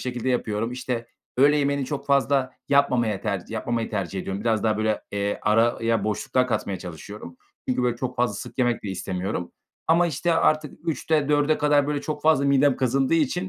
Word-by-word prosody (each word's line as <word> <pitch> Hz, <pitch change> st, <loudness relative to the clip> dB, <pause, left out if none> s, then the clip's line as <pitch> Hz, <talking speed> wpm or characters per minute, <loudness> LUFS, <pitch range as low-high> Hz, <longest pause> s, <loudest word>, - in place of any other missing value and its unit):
şekilde 125 Hz, 0 st, -3 dB
yapıyorum, 115 Hz, -1 st, -1 dB
işte, 125 Hz, -2 st, -3 dB, 0.3 s
öğle 145 Hz, +3 st, +5 dB
yemeğini 140 Hz, -1 st, +1 dB
çok 140 Hz, +2 st, -5 dB
fazla 140 Hz, -1 st, +2 dB, 0.2 s
yapmamaya 120 Hz, -8 st, +2 dB
tercih 100 Hz, -4 st, -3 dB
yapmamayı 115 Hz, +1 st, -2 dB
tercih 95 Hz, -2 st, -3 dB
ediyorum. 95 Hz, +2 st, -4 dB
Biraz 110 Hz, -1 st, +1 dB
daha, 110 Hz, -1 st, +1 dB
böyle, 110 Hz, 0 st, 0 dB
eee, 100 Hz, 0 st, -1 dB
araya 115 Hz, 0 st, +2 dB
boşluklar 125 Hz, +4 st, 0 dB
katmaya 100 Hz, -6 st, -2 dB
çalışıyorum 90 Hz, +1 st, -9 dB, 0.3 s
çünkü, 125 Hz, 0 st, +1 dB
böyle, 120 Hz, -1 st, +1 dB
çok 125 Hz, 0 st, -4 dB
fazla 120 Hz, -3 st, +1 dB
sık 100 Hz, -, -8 dB
yemek 120 Hz, -2 st, +1 dB
de 105 Hz, -, -5 dB
istemiyorum 95 Hz, 0 st, -4 dB, 0.3 s
ama, 170 Hz, +2 st, +4 dB
işte, 170 Hz, +2 st, 0 dB
artık 155 Hz, 0 st, 0 dB
3.00'te 155 Hz, -2 st, 0 dB
4.00'e 150 Hz, +1 st, +2 dB
kadar, 145 Hz, -1 st, +3 dB
böyle, 145 Hz, -1 st, -1 dB
çok 150 Hz, -1 st, -5 dB
fazla 155 Hz, -3 st, +4 dB
midem 140 Hz, -1 st, +4 dB
kazındığı 135 Hz, +3 st, +1 dB
için 165 Hz, +4 st, 0 dB
125 Hz, 180 wpm, -24 LUFS, 110-140 Hz, 0.3 s, öğle